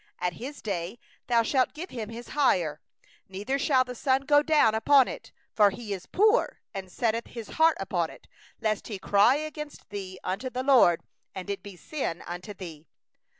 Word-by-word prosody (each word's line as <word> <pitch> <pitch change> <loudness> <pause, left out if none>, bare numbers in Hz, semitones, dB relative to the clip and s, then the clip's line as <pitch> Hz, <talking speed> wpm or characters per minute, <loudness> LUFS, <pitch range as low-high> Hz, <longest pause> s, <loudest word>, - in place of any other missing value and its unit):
15In 180 - +1
the - - -14
same 285 +2 -8
day 195 +1 -3 0.3
thou 235 -2 +4
shalt 260 +4 +1
give 345 +5 -7
him 225 -4 -5
his 235 +1 -8
hire, 175 - +1 0.5
neither 205 +9 -2
shall 265 -2 +3
the 250 -1 -7
sun 260 +2 +1
go 290 +1 +4
down 300 -8 +4
upon 260 +4 +5
it; - - -8 0.2
for 205 -2 +6
he 210 0 -5
is 190 -2 -7
poor, 430 +5 +3
and 190 -2 -6
setteth 230 +3 -1
his 230 -3 -8
heart 320 0 +3
upon 175 -4 -1
it: - - -15 0.3
lest 215 -2 -1
he 210 - -4
cry 200 +6 +4
against 300 0 -6
thee 190 -2 -6
unto 205 +8 -2
the 255 +1 -3
LORD 250 -11 +5 0.3
and 190 +1 -4
it 200 - -4
be 200 -2 -10
sin 220 - -4
in 175 +1 -5 0.2
thee. 165 -4 -9
225 Hz, 190 wpm, -27 LUFS, 190-275 Hz, 0.5 s, for